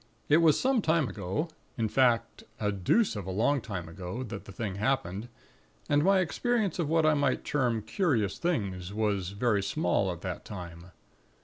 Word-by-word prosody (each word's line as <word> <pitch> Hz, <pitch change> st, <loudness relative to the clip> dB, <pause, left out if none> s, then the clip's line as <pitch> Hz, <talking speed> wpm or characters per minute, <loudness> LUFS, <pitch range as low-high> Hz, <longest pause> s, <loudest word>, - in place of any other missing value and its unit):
It 150 Hz, -, +6 dB
was 165 Hz, -3 st, +5 dB
some 260 Hz, -3 st, +2 dB
time 160 Hz, -5 st, +2 dB
ago, 105 Hz, -, -3 dB, 0.3 s
in 115 Hz, -2 st, +1 dB
fact 120 Hz, 0 st, +2 dB, 0.2 s
a 105 Hz, -1 st, 0 dB
deuce 105 Hz, -, +2 dB
of 100 Hz, -3 st, -5 dB
a -, -, -2 dB
long 120 Hz, +8 st, +2 dB
time 100 Hz, -7 st, -5 dB
ago, 90 Hz, +8 st, -6 dB
that 110 Hz, -4 st, -7 dB
the -, -, -10 dB
thing 100 Hz, -1 st, -4 dB
happened; 110 Hz, -2 st, -1 dB, 0.6 s
and 145 Hz, 0 st, +3 dB
my 195 Hz, +1 st, +4 dB
experience 210 Hz, -, 0 dB
of 160 Hz, -4 st, 0 dB
what 160 Hz, 0 st, +3 dB
I 155 Hz, -, +5 dB
might 145 Hz, -3 st, +1 dB
term 120 Hz, -6 st, 0 dB
'curious' 115 Hz, -, 0 dB
things 100 Hz, -, -2 dB
was 100 Hz, -4 st, 0 dB
very 105 Hz, +1 st, +1 dB
small 95 Hz, -1 st, 0 dB
at 85 Hz, -1 st, -7 dB
that 90 Hz, -2 st, -5 dB
time. 85 Hz, -4 st, -8 dB
110 Hz, 180 wpm, -29 LUFS, 95-150 Hz, 0.6 s, It